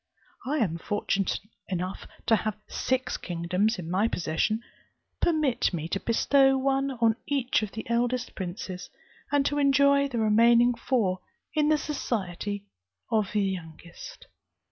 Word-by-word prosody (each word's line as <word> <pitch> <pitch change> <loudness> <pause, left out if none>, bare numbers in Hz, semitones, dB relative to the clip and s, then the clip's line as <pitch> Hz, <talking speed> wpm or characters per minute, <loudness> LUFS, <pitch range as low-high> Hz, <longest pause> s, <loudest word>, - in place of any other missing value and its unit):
I 295 +3 0
am 175 - 0
fortunate 200 0 -1 0.3
enough 185 0 -3 0.2
to 225 - +5
have 215 0 -3
six 260 0 -1
kingdoms 180 +6 0
in 175 -3 -6
my 190 +6 +2
possession; 195 +4 0 0.6
permit 305 -7 +2
me 160 -1 -3
to 195 - -1
bestow 270 +5 +3
one 270 +1 +1
on 225 -1 +4
each 270 -5 +1
of 215 -2 -4
the 220 +3 -6
eldest 240 +1 0
princes, 185 0 -6 0.4
and 285 -1 +3
to 290 0 +1
enjoy 280 0 +4
the 250 -4 -4
remaining 235 +2 +5
four 230 -6 0 0.3
in 300 -1 +2
the 310 - +4
society 205 - -3 0.5
of 215 -3 +1
the 210 -1 +2
youngest. 170 -3 -7
225 Hz, 140 wpm, -27 LUFS, 190-270 Hz, 0.6 s, to